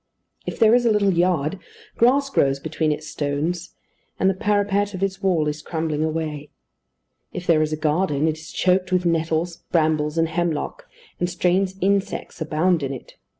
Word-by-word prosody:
If - - -4
there 225 -1 +5
is 245 0 +4
a - - +4
little 200 -2 +3
yard, 175 -1 +1 0.4
grass 275 +4 +3
grows 135 - +2
between 155 +1 -1
its 150 +1 -3
stones; 155 +5 -3 0.4
and 190 - +3
the 195 - +4
parapet 205 0 0
of 185 - -3
its 195 -1 -2
wall 175 -6 +2
is 150 +1 -3
crumbling 160 -2 -2
away. 155 -2 -3 0.8
If 180 - -5
there 160 -3 +4
is 155 0 0
a 155 - -1
garden, 155 -1 +1
it 155 0 -1
is 155 - -11
choked 185 0 +1
with 180 -1 +1
nettles, 165 0 0
brambles, 155 -2 +1
and 165 0 +3
hemlock, 175 - -3 0.3
and 175 - 0
strange 180 +2 +1
insects 195 -2 -1
abound 160 +2 +1
in 135 -1 -2
it. 130 - -8
170 Hz, 175 wpm, -22 LUFS, 155-190 Hz, 0.8 s, there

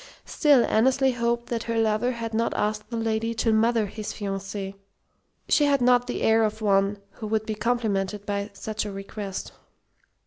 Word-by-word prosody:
Still, 285 -6 +4
Annesley 265 +4 +3
hoped 235 0 -1
that 230 -1 -1
her 230 0 -1
lover 225 +3 +1
had 230 -1 -5
not 230 +1 0
asked 210 0 -1
the 235 - -3
lady 225 0 -1
to 225 0 +1
"mother" 225 0 +3
his 210 +1 -6
fiancée. 195 -1 -4 0.7
She 295 - +4
had 280 -1 +3
not 245 0 +4
the 245 - -3
air 225 0 +4
of 215 0 -1
one 200 -1 +2
who 220 - -7
would 220 0 0
be 220 - -2
complimented 210 -3 -1
by 200 0 -2
such 215 +2 -4
a 210 - -5
request. 195 0 -6
220 Hz, 175 wpm, -25 LUFS, 205-235 Hz, 0.7 s, Still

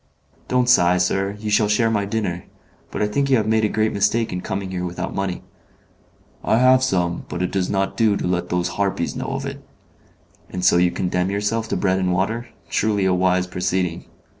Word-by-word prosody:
"Don't 125 -1 +1
sigh, 90 -7 +5
sir, 95 +3 0
you 105 0 -4
shall 105 0 +3
share 115 +2 +2
my 105 -2 0
dinner. 100 -5 -3 0.4
But - - -2
I - - +2
think 140 +6 0
you 130 - +5
have 110 - 0
made 110 0 +2
a 105 - +2
great 110 +1 0
mistake 105 +2 +1
in 90 - -3
coming 95 0 -4
here 90 -1 -3
without 90 +1 -4
money." 95 -2 -3 1.0
"I - - +2
have 130 +1 +5
some, 90 -8 0
but 90 - -3
it 90 - -2
does 95 -2 -1
not 95 -1 -1
do 110 -3 +3
to - - -3
let 90 0 -1
those 90 0 0
harpies 100 -1 -1
know - - -4
of - - -4
it." - - -7 0.9
"And 90 0 -3
so - - +5
you 90 0 +4
condemn 90 +1 -1
yourself 105 +3 -1
to - - -1
bread 95 -1 +1
and 90 -1 0
water. 110 +7 -1 0.2
Truly 105 -2 +1
a 95 - +3
wise 90 0 +2
proceeding! 90 -1 -2
95 Hz, 210 wpm, -21 LUFS, 90-110 Hz, 1.0 s, sigh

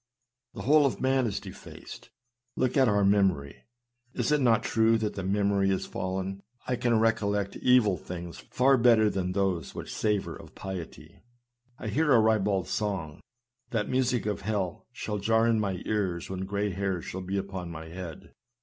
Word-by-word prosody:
The - - -6
whole 145 +1 +5
of 130 - -4
man 130 -1 +2
is 105 - -2
defaced. - - -11 0.5
Look 130 -1 0
at 135 -3 +5
our 105 -1 +2
memory; 95 -8 +1 0.5
is - - 0
it 150 -1 +3
not 115 -3 +3
true 115 0 +3
that 110 -1 -2
the 95 - -4
memory 100 0 +1
is 95 - 0
fallen? 95 +1 -4 0.2
I 125 - 0
can 120 -2 +2
recollect 105 -3 +1
evil 120 -7 +4
things 85 -1 -7
far 135 +1 +4
better 115 -3 +5
than 90 -1 -2
those 95 -6 -1
which - - -6
savor 105 -2 -1
of - - -13
piety. 95 -4 -8 0.6
I 110 - -5
hear 150 +7 +2
a 120 - +7
ribald 105 -5 +2
song, 95 -8 -3 0.5
that 110 -3 -1
music 125 -3 +1
of 105 -1 -2
hell 100 -3 -3
shall 105 -1 -4
jar 110 +3 +3
in 115 -1 +3
my 95 -4 -2
ear 95 -5 0
when 95 0 -4
gray 100 +1 -1
hairs 95 -2 -2
shall 95 - -5
be 95 +2 -3
upon 95 -3 -4
my 80 -1 -8
head. 85 -1 -8
100 Hz, 175 wpm, -28 LUFS, 95-115 Hz, 0.6 s, a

